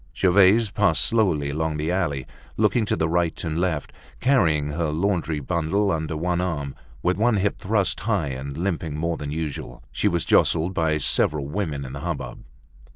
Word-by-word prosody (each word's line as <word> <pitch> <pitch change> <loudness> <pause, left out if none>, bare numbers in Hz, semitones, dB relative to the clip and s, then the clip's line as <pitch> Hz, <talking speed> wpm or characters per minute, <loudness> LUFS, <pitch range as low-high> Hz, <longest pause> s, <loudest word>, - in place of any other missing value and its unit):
Gervaise 95 +3 +4
passed 105 0 +3
slowly 90 - +1
along 80 +1 -2
the 75 +3 -1
alley, 75 -8 -1 0.3
looking 110 +1 +2
to - - 0
the 80 - 0
right 85 0 0
and 80 -1 -2
left, 85 -5 -2 0.3
carrying 80 - +2
her 80 +2 -1
laundry 80 -2 -1
bundle 90 +7 0
under 80 -1 -2
one 90 +2 0
arm, 75 -6 -3 0.3
with 90 0 +1
one 115 +1 +3
hip 100 +1 0
thrust 100 -2 0
high 95 -7 -1
and 70 +1 -6
limping 85 -4 -2
more 85 +1 -1
than 75 - -5
usual. 75 -1 -5
She - - 0
was 85 -1 0
jostled 85 +3 +3
by 80 -3 +1
several 75 0 +2
women 75 -5 -3
in 65 - -8
the 70 - -6
hubbub. 80 -6 -5
85 Hz, 175 wpm, -24 LUFS, 75-95 Hz, 0.3 s, Gervaise